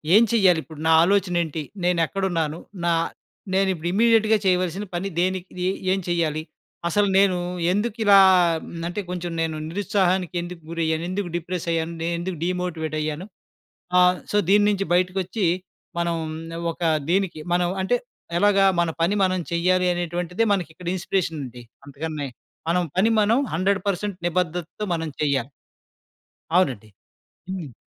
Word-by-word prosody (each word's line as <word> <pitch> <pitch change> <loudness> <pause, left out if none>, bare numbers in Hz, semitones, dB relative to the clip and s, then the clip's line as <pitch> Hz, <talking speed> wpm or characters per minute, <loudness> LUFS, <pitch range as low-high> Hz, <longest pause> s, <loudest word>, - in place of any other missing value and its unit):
ఏం 220 - +8
చేయ్యాలిప్పుడు? 180 -8 +2
నా - - +5
ఆలోచనేంటి? 175 -5 +1 0.2
నేనెక్కడున్నాను? 170 -2 0 0.3
నా 170 - +3 0.6
నేనిప్పుడు 190 -4 +1
ఇమీడియేట్‌గా 220 0 +4
చేయవలసిన 185 +1 +1
పని 180 +3 -2
దేనికి? 185 0 -1 0.4
ఏం 195 - +2
చేయాలి? 160 -3 0 0.5
అసలు 205 +4 +2
నేను 195 -2 +4 0.3
ఎందుకు 210 +3 -1
ఇలా 200 -1 +7 0.5
మ్ 165 -1 -7
అంటే 175 +4 -3
కొంచెం 180 -1 -4
నేను 160 -1 -1
నిరుత్సాహానికి 185 -1 0
ఎందుకు 175 0 -8
గురయ్యాను, 160 -1 -1
ఎందుకు 185 0 -2
డిప్రెస్ 175 +1 -4
అయ్యాను, 165 0 -1
నేనెందుకు 170 +2 -2
డీమోటివేట్ 175 -3 -2
అయ్యాను 155 +3 -3 0.7
ఆహ్, 180 0 +5 0.2
సో, 210 - +2
దీని 205 +1 +6
నించి 195 -1 0
బయటకొచ్చి, 185 +3 0 0.5
మనం 170 0 0 0.6
ఒక 165 - -14 0.3
దీనికి 185 -3 +1
మనం 175 0 +2
అంటే 190 +6 +2 0.4
ఎలాగా? 195 +1 +4
మన 170 -1 +2
పని 175 +5 +2
మనం 185 -1 +1
చెయ్యాలి 180 +2 +2
అనేటువంటిదే 175 +3 -1
మనకి 180 -5 -1
ఇక్కడ 175 +2 -10
ఇన్‌స్పిరేషనుంది. 160 -9 -3 0.2
అంతకన్నే 145 0 -5 0.4
మనం 180 +1 +2
పని 195 +5 +4
మనం 220 +5 +3
100% 200 +2 0
నిబద్దతతో 175 +2 -2
మనం 165 -1 -2
చెయ్యాలి. 140 -4 +1 1.1
అవునండీ. 130 - +1 0.6
హ్మ్. 175 -8 -5
180 Hz, 125 wpm, -23 LUFS, 165-195 Hz, 1.1 s, ఏం